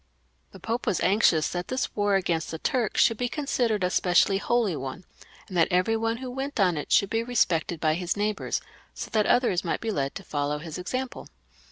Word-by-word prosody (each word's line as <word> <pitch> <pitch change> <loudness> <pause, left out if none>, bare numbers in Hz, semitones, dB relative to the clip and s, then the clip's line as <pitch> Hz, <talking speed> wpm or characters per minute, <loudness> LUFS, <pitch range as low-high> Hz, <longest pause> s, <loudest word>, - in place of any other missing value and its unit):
The 195 - -12
Pope 225 +6 -3
was 185 - +1
anxious 180 -5 +3
that 175 0 -4
this 255 0 -2
war 205 -1 +2
against 170 -4 0
the 160 - -4
Turks 235 +5 0
should 230 - +4
be 245 +1 -1
considered 245 -8 0
a 180 - +1
specially 185 +2 +3
holy 225 -5 +1
one, 135 +5 -6 0.4
and 185 - -8
that 165 -2 +4
every 185 +4 +2
one 225 +1 -1
who 255 0 -6
went 270 0 -4
on 180 -4 +3
it 150 - -5
should 200 - +4
be 225 - +1
respected 180 -9 0
by 155 0 +2
his 175 +3 -2
neighbours, 210 0 -1 0.3
so - - -6
that 215 -2 +2
others 245 -8 +2
might 170 - -1
b6 225 -2 -2
led 140 -5 -2
to 195 - -7
follow 145 -2 -2
his 160 +2 -7
example. 255 +8 -4
195 Hz, 210 wpm, -26 LUFS, 170-230 Hz, 0.4 s, should